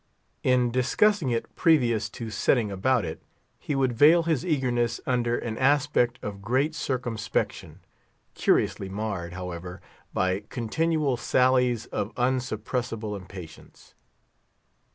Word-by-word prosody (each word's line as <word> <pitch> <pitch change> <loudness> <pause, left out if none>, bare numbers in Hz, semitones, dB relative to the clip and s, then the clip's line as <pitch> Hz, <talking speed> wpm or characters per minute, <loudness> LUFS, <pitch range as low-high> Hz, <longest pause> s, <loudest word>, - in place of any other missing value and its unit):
In 125 -2 +2
discussing 135 - +2
it 115 -1 -3
previous 120 - +3
to 115 +1 -7
setting 110 +1 +1
about 105 +3 +1
it, 80 - -6 0.4
he 145 - -3
would 130 -2 +1
veil 155 +8 +6
his 160 -3 0
eagerness 125 -8 0
under 120 -2 +1
an 115 -2 -4
aspect 135 -3 +2
of 100 -1 -6
great 130 +9 +1
circumspection, 120 -7 -3 0.5
curiously 95 - +1
marred, 95 -4 -4
however, 90 0 -6 0.3
by 95 +1 0
continual 150 +3 0
sallies 125 -1 +2
of 105 - -3
unsuppressible 120 -3 -2
impatience. 90 -4 -12
120 Hz, 110 wpm, -26 LUFS, 105-130 Hz, 0.5 s, veil